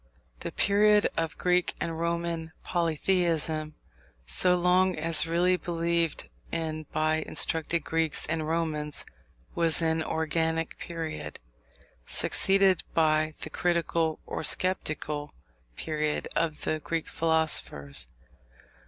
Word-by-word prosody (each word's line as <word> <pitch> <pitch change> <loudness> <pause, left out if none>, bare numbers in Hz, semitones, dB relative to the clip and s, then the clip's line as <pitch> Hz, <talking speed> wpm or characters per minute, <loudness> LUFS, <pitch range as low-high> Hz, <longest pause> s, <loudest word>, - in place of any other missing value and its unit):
The - - -5
period 210 +1 +4
of 165 -1 -2
Greek 180 0 +1
and 165 -1 -3
Roman 170 -1 -2
polytheism, 165 -2 0 0.5
so 180 - +4
long 180 +1 +3
as 160 0 +3
really 180 +2 +2
believed 170 -1 -1 0.2
in 155 -2 -3
by 155 0 +1
instructed 160 +1 +2
Greeks 160 -1 0
and 160 -1 -2
Romans, 155 -2 -1 0.5
was 165 -1 +4
an 160 -1 +1
organic 160 0 -1
period, 165 -2 -5 0.7
succeeded 195 -2 +3
by 155 -1 +2
the 155 - -5
critical 170 -2 0
or - - -4
sceptical 155 -4 -1 0.4
period 155 -1 -2
of 160 -2 -1
the 155 - -1
Greek 165 +1 -3
philosophers. 150 - 0
165 Hz, 105 wpm, -28 LUFS, 155-170 Hz, 0.7 s, period